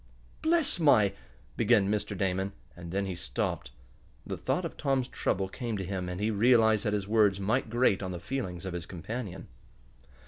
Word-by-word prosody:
"Bless 320 Hz, -, +2 dB
my 120 Hz, -, +5 dB, 0.2 s
!" -, -, -29 dB
began 95 Hz, -, +4 dB
Mr. 105 Hz, -1 st, -1 dB
Damon, 95 Hz, +1 st, -1 dB, 0.2 s
and 85 Hz, -1 st, -8 dB
then 100 Hz, +2 st, 0 dB
he 95 Hz, -, -3 dB
stopped. 90 Hz, -, -3 dB, 0.6 s
The -, -, -3 dB
thought -, -, -1 dB
of -, -, -5 dB
Tom's 135 Hz, -2 st, 0 dB
trouble 95 Hz, -6 st, -1 dB
came 115 Hz, +2 st, -4 dB
to 95 Hz, -, -3 dB
him, 90 Hz, -1 st, -3 dB
and 90 Hz, +1 st, -4 dB
he 105 Hz, +2 st, +1 dB
realized 110 Hz, 0 st, +4 dB
that 105 Hz, -, +1 dB
his 100 Hz, -2 st, -1 dB
words 105 Hz, -3 st, +3 dB
might 110 Hz, +5 st, 0 dB
grate 120 Hz, -4 st, +2 dB
on 95 Hz, -, -3 dB
the 90 Hz, -, -5 dB
feelings 95 Hz, -10 st, -4 dB
of 95 Hz, -, -4 dB
his 90 Hz, -1 st, -5 dB
companion. 95 Hz, +2 st, -6 dB
100 Hz, 185 wpm, -29 LUFS, 95-115 Hz, 0.6 s, my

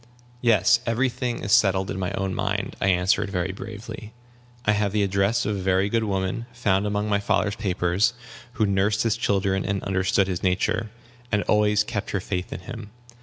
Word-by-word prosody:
"Yes, 115 Hz, -1 st, +4 dB
every 120 Hz, +3 st, +2 dB
thing 120 Hz, 0 st, -3 dB
is 100 Hz, -, -3 dB
settled 95 Hz, -2 st, +3 dB
in 95 Hz, -, -4 dB
my 90 Hz, -1 st, -1 dB
own 95 Hz, -1 st, -2 dB
mind," -, -, -2 dB
I -, -, +2 dB
answered, 95 Hz, +3 st, +2 dB
very 90 Hz, -1 st, -1 dB
bravely: 110 Hz, +2 st, -8 dB, 0.5 s
"I 105 Hz, -, +4 dB
have 105 Hz, -1 st, 0 dB
the 105 Hz, -1 st, +2 dB
address 100 Hz, +4 st, +1 dB
of 105 Hz, -, 0 dB
a -, -, -3 dB
very 95 Hz, +1 st, +1 dB
good 115 Hz, +1 st, +1 dB
woman, 95 Hz, +3 st, -2 dB
found 105 Hz, -5 st, +1 dB
among 105 Hz, +1 st, -1 dB
my 100 Hz, -1 st, +2 dB
father's 100 Hz, 0 st, 0 dB
papers, 100 Hz, +3 st, +1 dB, 0.4 s
who 120 Hz, -5 st, +1 dB
nursed 100 Hz, +1 st, +1 dB
his 115 Hz, -2 st, +1 dB
children 95 Hz, -4 st, 0 dB
and 100 Hz, 0 st, -2 dB
understood 95 Hz, +1 st, +1 dB
his 90 Hz, -2 st, -3 dB
nature, 100 Hz, +4 st, 0 dB, 0.4 s
and 105 Hz, -1 st, +2 dB
always 105 Hz, 0 st, +3 dB
kept 105 Hz, -2 st, -4 dB
her 95 Hz, -, -1 dB
faith 90 Hz, 0 st, -4 dB
in -, -, -6 dB
him. 115 Hz, +1 st, -8 dB
100 Hz, 190 wpm, -24 LUFS, 95-110 Hz, 0.5 s, Yes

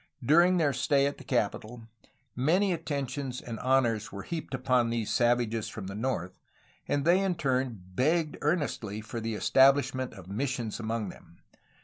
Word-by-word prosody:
During 175 Hz, +6 st, +5 dB
their 150 Hz, -5 st, +2 dB
stay 140 Hz, +2 st, +2 dB
at 140 Hz, -, -2 dB
the -, -, -10 dB
capital, 120 Hz, -2 st, -2 dB, 0.5 s
many 180 Hz, +9 st, +2 dB
attentions 140 Hz, -4 st, -3 dB
and 115 Hz, -4 st, -7 dB
honors 120 Hz, -5 st, +1 dB
were 100 Hz, -1 st, -7 dB
heaped 160 Hz, -5 st, -5 dB
upon 125 Hz, -2 st, +2 dB
these 115 Hz, -2 st, -2 dB
savages 120 Hz, -2 st, +1 dB
from 105 Hz, -, -7 dB
the 95 Hz, -, -6 dB
north, 105 Hz, -5 st, -3 dB, 0.5 s
and 145 Hz, 0 st, 0 dB
they 175 Hz, +3 st, +5 dB
in 195 Hz, -2 st, 0 dB
turn 130 Hz, -, -1 dB
begged 155 Hz, -, +1 dB
earnestly 145 Hz, -, -1 dB
for 110 Hz, +2 st, -6 dB
the 115 Hz, -1 st, -3 dB
establishment 130 Hz, +1 st, +3 dB
of 95 Hz, -2 st, -12 dB
missions 120 Hz, +2 st, -3 dB
among 110 Hz, -2 st, -2 dB
them. 85 Hz, -1 st, -15 dB
130 Hz, 155 wpm, -29 LUFS, 110-145 Hz, 0.5 s, During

